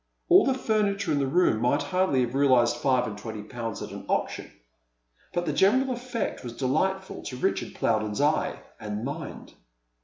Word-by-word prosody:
All 365 +3 +7
the 265 - +2
furniture 205 -4 0
in 145 - +2
the 135 - +1
room 140 -7 +2
might 125 +4 +2
hardly 185 -8 +1
have 120 0 -1
realized 130 -4 +4
five 130 -3 +2
and 105 - -5
twenty 105 0 -7
pounds 115 -1 -5
at - - -7
an - - -8
auction, - - -2 0.8
but 175 0 -1
the 150 - -1
general 255 - +3
effect 245 - -3
was 120 -2 -6
delightful 190 +9 -1
to 130 -3 -6
Richard 190 +9 -1
Plowden's 110 -1 0
eye 150 +2 +1 0.2
and 105 +2 -4
mind. 145 +2 -7
140 Hz, 175 wpm, -27 LUFS, 120-190 Hz, 0.8 s, All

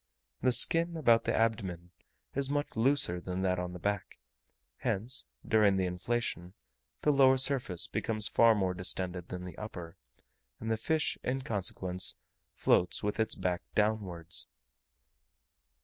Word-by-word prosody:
The 125 - +3
skin 165 +7 +3
about 115 -7 +4
the - - +1
abdomen 95 -6 -1 0.4
is 135 0 -1
much 145 +1 -2
looser 115 -7 +2
than 90 +1 -3
that 90 -1 +1
on 90 0 -4
the - - -6
back; 100 +2 -3 0.6
hence, 120 +7 -1 0.2
during 105 -4 +4
the 95 - +1
inflation, 90 -1 -3 0.5
the 150 - +4
lower 135 -2 +5
surface 130 -10 +1
becomes 110 -1 0
far 115 0 +5
more 95 -3 0
distended 90 -1 -3
than 90 0 -6
the 90 - -8
upper; 90 -5 -7 0.6
and 115 0 -3
the - - +3
fish, 155 +7 0
in 130 +1 -1
consequence, 95 -4 -1 0.4
floats 90 - +2
with 105 +2 -2
its 110 - +1
back 90 -1 -1
downwards. 100 -6 -1
105 Hz, 140 wpm, -31 LUFS, 90-120 Hz, 0.6 s, lower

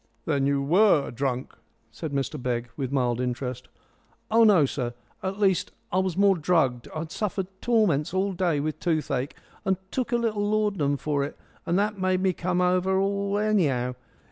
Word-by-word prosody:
"Then 140 -3 +1
you 140 -1 +1
were 175 0 +4
drunk?" 130 0 -2 0.4
said 145 +7 -6
Mr 140 +1 -2
Begg 120 -1 -2
with 135 -3 -3
mild 125 -3 +1
interest. 125 0 -3 0.6
"Oh, 230 +1 +6
no, 195 -9 +6
sir. 125 -3 -3 0.3
At 190 +1 -3
least 195 -3 +1 0.2
it 185 +1 +3
was 185 -2 -2
more 200 -1 +5
drugged. 150 -8 +1
I'd 160 +1 -4
suffered 200 -3 -2 0.2
torments 210 - +2
all 190 +2 0
day 175 -5 +1
with 155 +1 -3
toothache, 150 -5 -1 0.3
and 190 -2 +1
took 260 0 -2
a 240 - +3
little 220 -3 0
laudanum 205 -9 +1
for 140 +1 -1
it, 140 - -6 0.3
and 175 - +2
that 205 0 0
made 185 0 +1
me 190 -1 +2
come 180 +1 -1
over 185 +1 +2
all 200 +1 0
anyhow. 155 -13 +1
175 Hz, 170 wpm, -26 LUFS, 140-200 Hz, 0.6 s, Oh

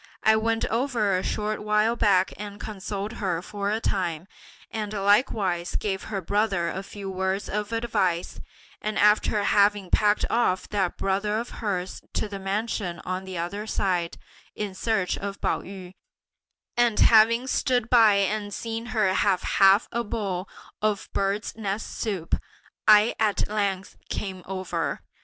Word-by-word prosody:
I 220 0 +6
went 225 +1 +1
over 230 -5 +1
a 185 - 0
short 215 +2 -2
while 210 +2 +2
back 190 -5 +3
and 205 0 -8
consoled 205 0 -5
her 180 -4 0
for 200 0 -3
a 215 +2 0
time, 175 -6 -2 0.4
and 215 -2 -3
likewise 200 -3 +1
gave 190 -2 -2
her 200 -3 -3
brother 195 -2 0
a 190 - -4
few 200 0 -8
words 190 +1 -1
of 210 +1 -3
advice; 190 -7 -1 0.4
and 215 0 -2
after 210 0 +3
having 200 -2 +3
packed 210 0 +3
off 230 -6 +1
that 195 -4 -1
brother 200 +2 0
of 235 +2 -4
hers 190 -4 -3
to - - -1
the 200 -1 -6
mansion 195 -2 -2
on 185 +1 -3
the 190 -1 -6
other 200 +6 -4
side, 180 -5 -1 0.4
in 205 -2 -4
search 195 -1 -1
of 200 0 -5
Pao - - 0
yü, 185 -1 -10 0.8
and 240 -3 +2
having 230 +2 +6
stood 250 -3 +1
by 225 -4 +6
and 205 +1 0
seen 230 0 -4
her 195 -3 +3
have 190 -2 +2
half 195 +2 +5
a 235 +1 -1
bowl 200 -4 -3 0.3
of 210 -2 0
birds' 200 +2 -1
nests 210 -1 -4
soup, 190 -7 -1 0.5
I 215 +2 +7
at 215 -2 +1
length 200 -2 -2
came 190 -2 -4
over. 175 -6 -3
205 Hz, 150 wpm, -26 LUFS, 190-215 Hz, 0.8 s, I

